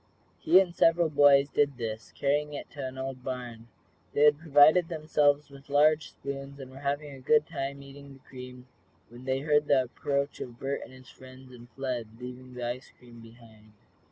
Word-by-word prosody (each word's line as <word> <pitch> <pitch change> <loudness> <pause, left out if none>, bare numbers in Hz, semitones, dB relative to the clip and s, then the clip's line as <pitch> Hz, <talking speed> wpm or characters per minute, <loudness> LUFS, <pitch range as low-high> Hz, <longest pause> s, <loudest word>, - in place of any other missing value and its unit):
He 180 +4 +6
and 185 -3 0
several 165 0 +3
boys 140 -1 +6
did 145 -2 0
this, 110 -2 -5
carrying 145 +1 0
it - - -8
to 140 -3 -5
the 130 - -10
old 130 -1 -5
barn. 120 -3 -6 0.5
They 145 - +3
had 150 -1 +5
provided 155 +2 +5
themselves 150 -3 +1
with 140 0 -15
large 150 +2 +3
spoons, 140 0 -7
and 130 -1 -9
were 135 - -11
having 145 +1 -3
a 135 - -11
good 150 +3 +3
time, 140 -3 -5
eating 140 0 -12
the 135 - -20
cream, 125 -1 -10 0.4
when 120 +2 -13
they 130 0 -1
heard 150 0 +2
the 135 -2 +4
approach 140 +3 -3
of 120 -2 -8
Bert 135 +1 -3
and - - -13
his 130 0 -15
friends, 130 0 -14
and 120 -1 -14
fled, 120 -4 -5
leaving 125 0 -9
the 120 +1 -4 0.2
cream 120 -1 -16
behind. 115 -2 -17
135 Hz, 185 wpm, -28 LUFS, 125-145 Hz, 0.5 s, He